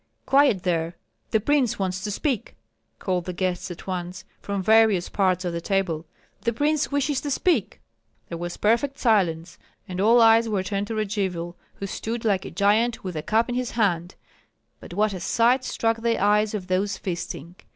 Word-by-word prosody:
"Quiet 270 -9 +4
there! 170 -1 -1 0.3
the 220 - +2
prince 265 +1 +1
wants 185 -1 -2
to 210 - -2
speak!" 245 +2 -2 0.4
called 180 -2 -2
the 180 - -4
guests 185 +1 -2
at 175 - -9
once, 180 -1 -5 0.2
from 200 -1 -3
various 220 -3 +4
parts 185 -2 +1
of 175 - -2
the 170 - -3
table. 170 -4 -1 0.3
"The 235 - 0
prince 295 +5 0
wishes 285 -1 0
to 290 - -4
speak!" 340 +5 0 0.5
There 170 - -5
was 175 0 -5
perfect 235 +6 +1
silence; 175 -8 +1 0.3
and 185 0 -3
all 230 +4 +5
eyes 225 0 +5
were 200 -3 0
turned 200 +1 -2
to 225 - -4
Radzivill, 190 -5 -2 0.2
who 200 - -6
stood, 225 +4 -4
like 195 -3 +1
a - - -5
giant, 220 +4 +1
with 185 -3 -5
a 155 - -2
cup 220 +8 +1
in 245 - -3
his 250 0 -1
hand. 180 -5 0 0.6
But 175 - -10
what 210 +1 +2
a 185 - -5
sight 235 +8 +2
struck 225 -2 0
the 230 0 +1
eyes 210 +2 +2
of 195 -3 -4
those 195 +2 0
feasting! 170 -2 -5
200 Hz, 185 wpm, -24 LUFS, 180-230 Hz, 0.6 s, all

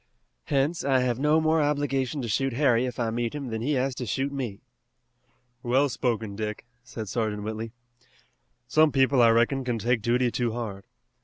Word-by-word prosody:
Hence 145 +4 0
I 135 -2 +3
have 125 -1 0
no 150 +3 +3
more 160 0 +2
obligation 145 -2 0
to - - -3
shoot 135 +4 0
Harry 125 -2 +2
if 125 - -6
I 115 -2 0
meet 120 +2 -2
him 140 -4 -5
than 110 -1 -3
he 145 +6 0
has 135 0 0
to 125 - -4
shoot 135 +7 -1
me." 125 -8 -5 1.0
"Well 130 +4 +2
spoken, 110 -4 -2
Dick," 105 +1 -4 0.2
said 110 -4 -7
Sergeant 105 -1 -2
Whitley. 110 +1 -4 1.0
"Some 155 -1 +4
people, 135 -1 +3
I 115 - +7
reckon, 120 +4 +2
can 120 -2 -1
take 120 +1 0
duty 120 +2 +1
too 120 -2 -1
hard. 105 -5 -5
125 Hz, 180 wpm, -26 LUFS, 115-135 Hz, 1.0 s, I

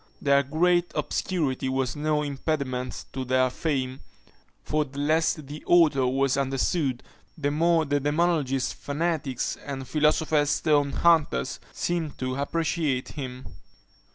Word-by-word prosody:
Their 140 0 +4
great 175 +5 +2
obscurity 150 -3 -1
was 130 -1 -1
no 150 0 0
impediment 135 -3 -3
to 130 - -3
their 130 0 +2
fame; 130 -3 -2 0.6
for 150 0 0
the 140 -1 -12
less 155 +3 +2
the 150 0 -9
author 155 -7 +5
was 135 +1 +1
understood, 135 0 0 0.3
the 145 -2 -1
more 165 +1 +3
the 145 0 0
demonologists, 145 -3 +1
fanatics, 145 -3 -2
and 135 -2 -6
philosopher's 150 +1 +2
stone 145 -1 +2
hunters 160 - +2
seemed 170 -4 -2
to 130 0 -2
appreciate 150 -2 -1
him. 130 -3 -7
145 Hz, 125 wpm, -26 LUFS, 130-160 Hz, 0.6 s, author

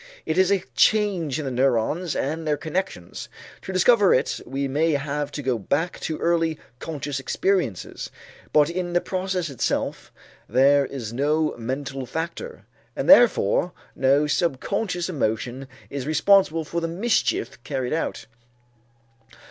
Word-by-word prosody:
It - - 0
is 190 0 +4
a 195 -2 +2
change 195 -10 +2
in 155 - -4
the 135 - -2
neurons 135 +6 +1
and 160 +4 -2
their 150 -1 +1
connections. 155 - -4 0.3
To - - -6
discover 195 +2 +5
it 130 - 0
we 135 +2 -2
may 155 +4 +1
have 145 +1 -2
to 145 - -5
go 125 -3 0
back 150 - -1
to 155 - -3
early 165 -2 +1 0.2
conscious 145 -3 -4
experiences, 175 - -1 0.4
but 150 -1 +5
in 175 +1 -3
the 175 - +4
process 185 -3 -2
itself 130 - -2 0.4
there 135 +3 +4
is 115 -5 -6
no 150 +4 +1
mental 130 +2 -4
factor, 170 - -5 0.3
and - - -3
therefore 235 - +5 0.2
no 140 +3 +3
subconscious 175 +5 -1
emotion 130 -4 -2 0.2
is 140 -1 -4
responsible 165 +1 +3
for 170 +3 -3
the 165 - -1
mischief 170 - -1
carried 130 -2 -2
out. 165 - -2
155 Hz, 140 wpm, -24 LUFS, 135-175 Hz, 0.4 s, discover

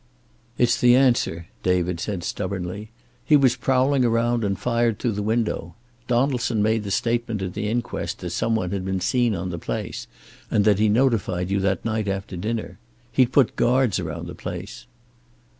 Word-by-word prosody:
"It's 120 -1 +2
the 125 0 +6
answer," 120 -10 +2 0.2
David 90 -1 0
said 95 -1 -3
stubbornly. 95 +2 -4 0.3
"He 150 - +4
was 130 -3 +3
prowling 135 +1 +2
around, 115 0 +1
and 100 -2 0
fired 115 -3 +1
through 120 - -1
the 105 -1 -3
window. 105 -6 -1 0.3
Donaldson 125 -3 +1
made 110 0 +1
the - - -4
statement 115 -1 -1
at 90 -2 -4
the 105 +1 -2
inquest 120 +1 -3
that - - -4
some 115 0 0
one 90 -5 -1
had 100 -2 -2
been 95 0 -1
seen 120 +3 +1
on 90 +1 -4
the 85 - -5
place, - - -5 0.4
and 100 - +2
that 105 -2 +4
he 110 0 +3
notified 105 -6 +1
you 100 - +2
that 95 -2 0
night 110 -2 -1
after 95 0 -3
dinner. 105 0 -4 0.3
He'd 125 +1 +3
put 135 -4 +3
guards 125 -3 +2
around - - -5
the - - -7
place." - - -7
110 Hz, 175 wpm, -23 LUFS, 95-120 Hz, 0.4 s, the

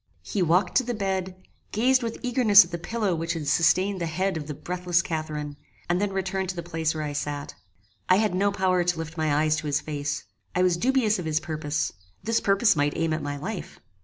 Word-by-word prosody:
He 200 - -2
walked 175 +3 +3
to 260 - +3
the 240 -1 -3
bed, 190 -2 -2 0.4
gazed 255 +4 +3
with 230 -1 -3
eagerness 235 -6 +6
at 170 - -15
the 170 - -4
pillow 210 +1 -1
which 165 0 -2
had 160 -4 -5
sustained 185 +5 +2
the 170 - -1
head 185 +4 -1
of 150 -2 -5
the 150 - -5
breathless 180 0 0
Catharine, 150 -2 -4 0.3
and 175 +2 +1
then 205 -1 0
returned 190 -1 -2
to 185 - -3
the 170 - -5
place 160 -2 -2
where 155 - -3
I 145 -1 -3
sat. 145 0 -4 0.6
I 185 - +7
had 210 -1 +2
no 200 +2 +2
power 185 -2 +1
to 175 -1 0
lift 165 0 -6
my 155 -2 0
eyes 155 0 +2
to 155 -1 -4
his 145 0 +1
face: 145 -1 -4 0.3
I 180 - +3
was 180 -2 +3
dubious 225 0 +2
of 175 - -5
his 155 -1 +1
purpose: 155 -1 -2 0.3
this 225 +3 +1
purpose 200 +1 +3
might 145 0 0
aim 165 -1 0
at 155 - -2
my 145 0 -4
life. 190 +6 -6
175 Hz, 225 wpm, -26 LUFS, 155-195 Hz, 0.6 s, I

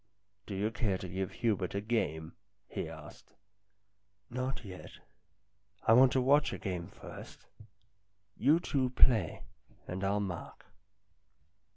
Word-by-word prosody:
" 100 +1 -48
Do 100 - -4
you 105 +3 0
care 105 -4 0
to 95 - -6
give 95 +1 -3
Hubert 105 -7 0
a - - +1
game?" 95 -8 -1 0.3
he 80 - -4
asked. 80 -2 -12 0.5
" 100 +3 -47
Not 130 0 -3
yet. 95 -2 -8 1.0
I 110 - +6
want 130 +2 +7
to 130 - +3
watch 145 +3 +4
a - - -3
game 90 -3 -4
first. 95 - -11 0.9
You 150 +7 +4
two 135 -6 0
play, 125 -3 +3 0.4
and 95 +2 -4
I'll 100 +1 +2
mark." 95 -5 -5
100 Hz, 140 wpm, -32 LUFS, 95-125 Hz, 1.0 s, want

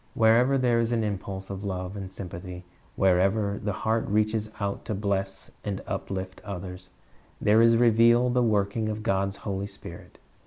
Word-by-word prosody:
Wherever 120 +4 +4
there 120 -3 +2
is 115 0 0
an 115 -2 +1
impulse 95 -2 -4
of 95 +1 -6
love 95 -1 -4
and 95 -2 -6
sympathy, 90 -1 -8 0.3
wherever 100 +2 +2
the 105 - 0
heart 110 +1 +1
reaches 110 +1 +1
out 100 -1 -2
to 110 - -2
bless 95 -1 -2
and 100 -2 -3
up - - -4
lift 95 -1 -5
others, 90 -2 -7 0.5
there 110 +2 +4
is 115 0 +6
revealed 120 +1 +5
the 125 - +3
working 110 -1 +1
of 110 0 -4
God's 95 -2 0
Holy 100 -1 -2
Spirit. - - -11
100 Hz, 165 wpm, -27 LUFS, 95-115 Hz, 0.5 s, is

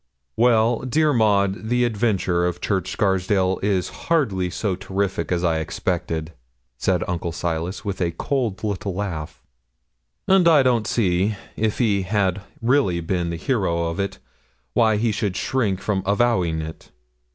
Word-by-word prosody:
'Well, 115 -1 +3
dear 150 +4 +1
Maud, 105 -2 +2
the 125 0 +2
adventure 100 -6 +1
of 90 - -3
Church 95 -3 -1
Scarsdale 95 -1 +1
is 95 -3 0 0.2
hardly 105 - +1
so 95 +1 -2
terrific 95 -2 -2
as 90 -1 0
I 80 -2 +2
expected,' 85 -1 -3 0.4
said 90 -2 0
Uncle 85 -2 -2
Silas 85 +4 -3
with 100 -2 -3
a 85 - +2
cold 110 +3 -2
little 100 -2 -2
laugh; 90 -7 -5 0.8
'and 190 -2 +5
I 155 -5 +6
don't 120 -4 +2
see, 100 -1 +1 0.2
if 110 -1 0
he 105 -5 +2
had 95 0 0 0.2
really 120 -8 +2
been 85 0 -1
the 85 - -3
hero 85 -7 0
of 85 - -6
it, 100 -1 -2 0.6
why 110 -2 +3
he 115 +1 +1
should 105 -3 -2
shrink 110 -8 0
from 100 -2 -1
avowing 100 -7 +2
it. 80 +1 -9
100 Hz, 150 wpm, -22 LUFS, 90-110 Hz, 0.8 s, I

